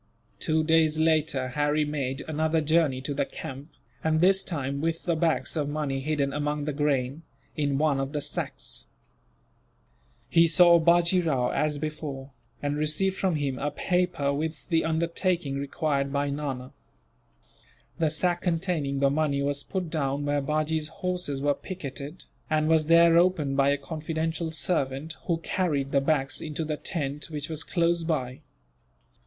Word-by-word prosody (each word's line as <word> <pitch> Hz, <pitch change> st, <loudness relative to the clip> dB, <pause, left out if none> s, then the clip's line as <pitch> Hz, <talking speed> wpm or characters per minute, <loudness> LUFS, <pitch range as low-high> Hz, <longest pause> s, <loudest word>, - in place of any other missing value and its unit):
Two 155 Hz, 0 st, +1 dB
days 160 Hz, -1 st, +3 dB
later, 155 Hz, -5 st, +2 dB
Harry 150 Hz, +3 st, +1 dB
made 140 Hz, -2 st, -3 dB
another 160 Hz, +1 st, +1 dB
journey 155 Hz, -4 st, +2 dB
to 145 Hz, +2 st, -3 dB
the 140 Hz, 0 st, 0 dB
camp, 135 Hz, +2 st, -8 dB, 0.3 s
and 155 Hz, 0 st, +2 dB
this 190 Hz, +3 st, +4 dB
time 140 Hz, -5 st, -3 dB
with 165 Hz, +1 st, -1 dB
the 170 Hz, -, +1 dB
bags 160 Hz, +1 st, 0 dB
of 145 Hz, -2 st, -1 dB
money 145 Hz, -2 st, -2 dB
hidden 140 Hz, -1 st, -1 dB
among 150 Hz, 0 st, -1 dB
the 150 Hz, -, -2 dB
grain, 140 Hz, 0 st, 0 dB, 0.3 s
in 145 Hz, -2 st, 0 dB
one 145 Hz, -2 st, +2 dB
of 135 Hz, 0 st, -2 dB
the 150 Hz, -, -2 dB
sacks. -, -, -2 dB, 1.4 s
He 165 Hz, 0 st, +5 dB
saw 170 Hz, +1 st, +6 dB
Bajee 170 Hz, +2 st, +4 dB
Rao, 135 Hz, -7 st, +1 dB
as 150 Hz, -1 st, 0 dB
before, 145 Hz, -3 st, -5 dB, 0.3 s
and 145 Hz, 0 st, -1 dB
received 155 Hz, +6 st, 0 dB
from 190 Hz, -3 st, 0 dB
him 140 Hz, -3 st, -2 dB
a 145 Hz, -, 0 dB
paper, 180 Hz, -3 st, 0 dB
with 155 Hz, +1 st, -4 dB
the 165 Hz, -2 st, +3 dB
undertaking 165 Hz, -2 st, 0 dB
required 140 Hz, -1 st, -1 dB
by 140 Hz, 0 st, 0 dB
Nana. 135 Hz, -3 st, -4 dB, 1.3 s
The 160 Hz, -2 st, +3 dB
sack 175 Hz, +3 st, 0 dB
containing 165 Hz, -6 st, -1 dB
the 140 Hz, 0 st, +4 dB
money 140 Hz, -2 st, +1 dB
was 140 Hz, 0 st, -1 dB
put 180 Hz, +2 st, -4 dB
down 145 Hz, -2 st, -1 dB
where 145 Hz, 0 st, +1 dB
Bajee's 155 Hz, +2 st, -1 dB
horses 160 Hz, -4 st, -3 dB
were 145 Hz, 0 st, +3 dB
picketed, 145 Hz, -2 st, -7 dB, 0.3 s
and 155 Hz, -1 st, +2 dB
was 160 Hz, -1 st, +3 dB
there 170 Hz, 0 st, +6 dB
opened 170 Hz, -6 st, +2 dB
by 140 Hz, 0 st, +4 dB
a 140 Hz, -, +2 dB
confidential 160 Hz, +2 st, -3 dB
servant, 145 Hz, 0 st, -1 dB
who 170 Hz, -3 st, +1 dB
carried 150 Hz, -7 st, -1 dB
the 140 Hz, -, +3 dB
bags 135 Hz, -2 st, +1 dB
into 155 Hz, +1 st, -3 dB
the 155 Hz, -1 st, -2 dB
tent 145 Hz, -3 st, -3 dB
which 150 Hz, -1 st, -4 dB
was 160 Hz, -1 st, -2 dB
close 170 Hz, -1 st, +1 dB
by. 130 Hz, -6 st, -2 dB
150 Hz, 160 wpm, -27 LUFS, 140-165 Hz, 1.4 s, saw